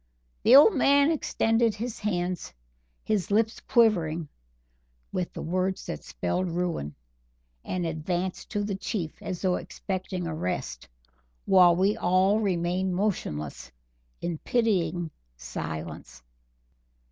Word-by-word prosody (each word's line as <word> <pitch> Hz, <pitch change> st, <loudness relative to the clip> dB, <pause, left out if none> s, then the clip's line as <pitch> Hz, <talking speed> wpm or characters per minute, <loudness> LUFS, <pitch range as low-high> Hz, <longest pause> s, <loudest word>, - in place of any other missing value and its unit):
The 245 Hz, -, +7 dB
old 295 Hz, +10 st, +9 dB
man 280 Hz, 0 st, +4 dB
extended 225 Hz, -7 st, +1 dB
his 230 Hz, +2 st, -5 dB
hands, 180 Hz, -, -2 dB, 0.5 s
his 200 Hz, -6 st, 0 dB
lips 220 Hz, +2 st, +1 dB
quivering 170 Hz, -9 st, +2 dB, 0.8 s
with 180 Hz, -, -2 dB
the -, -, -6 dB
words 185 Hz, +3 st, -1 dB
that 75 Hz, -, -5 dB
spelled 90 Hz, -, -2 dB
ruin, 165 Hz, -, -2 dB, 0.7 s
and 180 Hz, -2 st, -2 dB
advanced 175 Hz, +3 st, -3 dB
to 205 Hz, -3 st, -1 dB
the 205 Hz, 0 st, -2 dB
Chief, 190 Hz, -4 st, -4 dB
as 180 Hz, 0 st, -5 dB
though 185 Hz, -1 st, +2 dB
expecting 185 Hz, -2 st, -4 dB
arrest, 90 Hz, -, -4 dB, 0.6 s
while 180 Hz, -2 st, +6 dB
we 195 Hz, +4 st, +2 dB
all 190 Hz, +2 st, +3 dB
remained 185 Hz, -2 st, 0 dB
motionless, 75 Hz, -, -2 dB, 0.5 s
in 170 Hz, -2 st, -3 dB
pitying 175 Hz, -8 st, 0 dB, 0.3 s
silence. 75 Hz, +2 st, -6 dB
180 Hz, 110 wpm, -27 LUFS, 165-210 Hz, 0.8 s, old